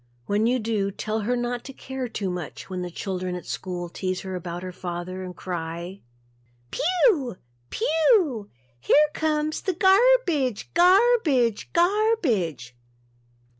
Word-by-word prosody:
When 210 +2 +1
you 250 +2 +2
do, 215 -4 -1
tell 215 +2 -3
her 230 +4 0
not 240 0 -2
to 270 - -8
care 265 -1 -5
too 200 -5 -3
much 180 +1 -7
when 185 -1 -3
the 180 - -4
children 185 0 -4
at 180 - -7
school 180 -2 -4
tease 185 +1 -3
her 190 -1 -6
about 175 0 -5
her 185 - -5
father 180 +1 -5
and 180 -1 -7
cry 170 +1 -5 0.7
"Phew 340 - +2 0.3
phew, 315 - +2 0.3
here 295 - +4
comes 310 -1 -1
the 380 - -1
gar 380 +3 +5 0.3
bidge 270 - -1
Garrr 400 +8 +5
bidge 245 - +1
Garrr 425 +6 +3
bidge." 165 - -1
220 Hz, 145 wpm, -25 LUFS, 185-310 Hz, 0.7 s, gar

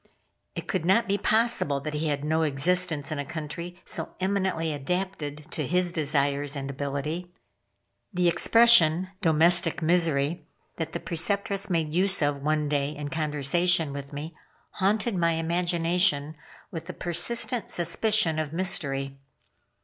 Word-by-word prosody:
It - - -6
could - - -1
not 195 +7 +2
be 200 +1 0
possible 220 -10 +2
that 155 +1 -5
he 155 +1 -2
had 145 -1 -2
no 160 +1 +1
existence 160 +1 0
in 155 - -3
a - - -2
country 170 +4 -7
so - - -4
eminently 185 -4 -1
adapted 150 -1 -4
to 150 -5 -3
his 180 +2 +1
desires 145 -2 0
and 140 -1 -5
ability. 145 +6 -4 0.8
The 180 -2 +1
expression, 185 -3 +5
"domestic 165 0 +3
misery," 160 -1 +1 0.3
that 160 -1 -4
the - - -3
Preceptress 195 +4 -1
made 160 -4 -1
use 190 0 +2
of 145 -1 -1
one 150 +1 0
day 145 -1 0
in 145 -1 -6
conversation 155 +1 +1
with 140 0 -7
me, 150 +3 -7 0.4
haunted 210 +4 0
my 170 -2 +1
imagination 170 -1 0 0.4
with 165 0 -7
a - - -4
persistent 210 +6 -1
suspicion 175 0 +1
of 155 -1 -4
mystery. 140 -7 -1
165 Hz, 140 wpm, -26 LUFS, 145-180 Hz, 0.8 s, expression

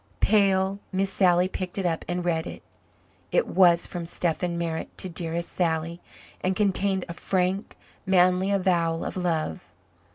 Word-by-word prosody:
Pale, 195 -2 +3
Miss 195 0 -1
Sally 180 -1 +4
picked 185 0 -4
it 195 - -1
up 165 -2 0
and 175 0 -2
read 165 -1 0
it. - - -9 0.7
It - - +3
was 175 -2 +4
from 175 -2 -5
Stephen 170 0 -2
Merritt 165 -1 -4
to 185 - -3
"dearest 170 0 -3
Sally," 165 -1 -1 0.4
and 185 +1 +1
contained 195 -1 +1
a 170 - -6
frank, 185 +3 -1 0.3
manly 185 0 +3
avowal 175 -4 +1
of - - -4
love. 165 - -2
180 Hz, 150 wpm, -26 LUFS, 170-190 Hz, 0.7 s, Sally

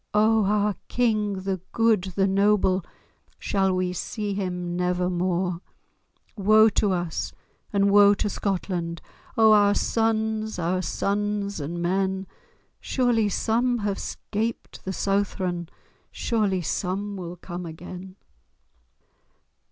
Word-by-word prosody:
O 215 0 +4
our 210 +1 +2
King—the 205 -6 0
good, 225 -5 +3
the 195 - +3
noble, 195 -1 +3 0.5
Shall 195 -1 +1
we 185 0 0
see 205 +3 -3
him 180 -3 -3
never 180 0 0
more? 180 0 -1 0.7
Woe 215 +2 +6
to 205 -1 +1
us, 175 -3 -2 0.4
and 200 -1 +3
woe 205 0 +7
to - - -1
Scotland! 180 -4 -2 0.4
O 220 -1 +6
our 205 -1 +5
sons, 220 -1 0
our 180 +1 0
sons 200 +2 -1
and 170 +4 -4
men! 190 +1 0 0.5
Surely 240 -5 +1
some 240 +5 +1
have 205 -3 -2
'scaped 225 +2 -4
the 190 - -2
Southron, 185 -3 -1 0.4
Surely 205 -6 0
some 200 +5 -2
will 175 -2 -6
come 175 0 -7
again!" 180 +3 -9
195 Hz, 115 wpm, -25 LUFS, 180-210 Hz, 0.7 s, woe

